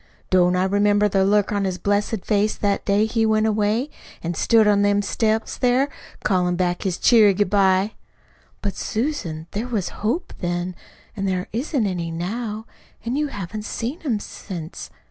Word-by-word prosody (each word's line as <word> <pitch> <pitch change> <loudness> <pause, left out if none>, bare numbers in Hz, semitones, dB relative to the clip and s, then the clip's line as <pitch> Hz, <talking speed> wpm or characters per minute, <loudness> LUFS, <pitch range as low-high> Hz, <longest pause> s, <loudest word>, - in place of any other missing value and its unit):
Don't 180 -1 +4
I 180 - +2
remember 205 +2 +3
the 195 -1 +2
look 205 +1 +2
on 205 -1 0
his 185 -2 -1
blessed 205 +2 -1
face 210 0 +2
that 200 -1 -1
day 205 +1 +3
he 225 0 0
went 220 0 +3
away, 220 +6 +1 0.3
an' 170 +1 -2
stood 220 +5 +4
on 205 -1 +4
them 205 0 +2
steps 220 +2 -1
there, 255 +3 +3 0.4
callin' 180 -3 +2
back 175 0 0
his 185 -2 -1
cheery 215 -5 +5
good 200 -1 +1
bye?" 195 +1 +3 0.7
"But, 200 -2 -2
Susan, 215 - -3
there 220 +4 -3
was 215 -7 -2
hope 235 - -1
then, 175 0 -2 0.4
an' 195 -2 -3
there 185 -1 -1
isn't 255 0 0
any 175 -4 -2
now 210 +6 -4 0.4
an' 235 +3 -1
you 300 +1 0
haven't 210 -3 -6
seen 245 +10 -4
him 245 -9 -1
since. 175 -5 -8
205 Hz, 170 wpm, -22 LUFS, 185-220 Hz, 0.7 s, cheery